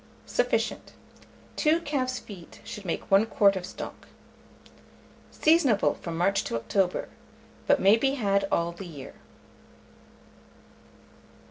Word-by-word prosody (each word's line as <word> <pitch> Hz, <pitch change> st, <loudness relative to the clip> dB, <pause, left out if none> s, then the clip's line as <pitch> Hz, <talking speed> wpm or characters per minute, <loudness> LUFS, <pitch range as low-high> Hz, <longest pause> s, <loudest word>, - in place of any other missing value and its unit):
Sufficient. -, -, -1 dB, 0.6 s
2 320 Hz, +2 st, +3 dB
calf's 260 Hz, -5 st, -1 dB
feet 190 Hz, -8 st, -11 dB
should 210 Hz, -, -8 dB
make 170 Hz, -, -4 dB
1 200 Hz, +3 st, +5 dB
quart 200 Hz, -3 st, +4 dB
of 180 Hz, -1 st, -4 dB
stock. -, -, -9 dB, 1.2 s
Seasonable 300 Hz, -10 st, +3 dB
from 165 Hz, -1 st, -6 dB
March 195 Hz, +3 st, +2 dB
to -, -, -3 dB
October, 180 Hz, -, 0 dB, 0.6 s
but 285 Hz, -, +4 dB
may 200 Hz, +1 st, +6 dB
be 270 Hz, +3 st, +1 dB
had 200 Hz, -5 st, +1 dB
all 170 Hz, 0 st, +1 dB
the 175 Hz, +2 st, -9 dB
year. 145 Hz, -6 st, -10 dB
200 Hz, 115 wpm, -27 LUFS, 180-255 Hz, 1.2 s, may